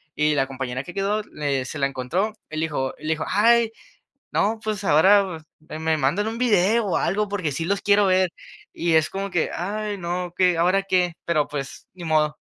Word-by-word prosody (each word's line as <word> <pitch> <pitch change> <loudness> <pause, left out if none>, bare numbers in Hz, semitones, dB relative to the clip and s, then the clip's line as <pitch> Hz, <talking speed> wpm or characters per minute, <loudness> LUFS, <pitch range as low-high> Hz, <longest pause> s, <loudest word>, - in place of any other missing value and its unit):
y 150 0 +2
la 135 -2 +2
compañera 130 -1 -4
que 180 - -10
quedó, 200 +3 0
le 140 -8 -2
se 145 +3 -6
la 140 - +2
encontró, 150 +11 -2 0.2
y 155 - -7
le - - -1
dijo 135 -4 -2
le 155 - -6
dijo: 160 -1 -1
"Ay, 230 +2 +4 0.6
no, 220 +2 +1
pues 215 -2 -3
ahora 185 0 +4
me 155 0 -9
me 160 0 +1
mandan 150 +9 +1
un 225 +1 -4
video 225 -1 +3
o 185 - +1
algo 210 +2 0
porque 185 -7 -2
sí 165 +4 -3
los 200 +3 0
quiero 205 0 +4
ver", 185 -1 +3 0.4
y 170 -1 0
es 160 0 +3
como 195 +1 -3
que: 175 -4 0
"Ay, 205 +3 -3
no, 175 0 -3
¿qué, 180 -2 +3
ahora 180 +4 +3
qué?". 180 -3 +1
Pero, 155 -4 +1
pues 140 -2 -6
ni 180 -1 -10
modo. 155 -1 +1
180 Hz, 205 wpm, -23 LUFS, 155-200 Hz, 0.6 s, Ay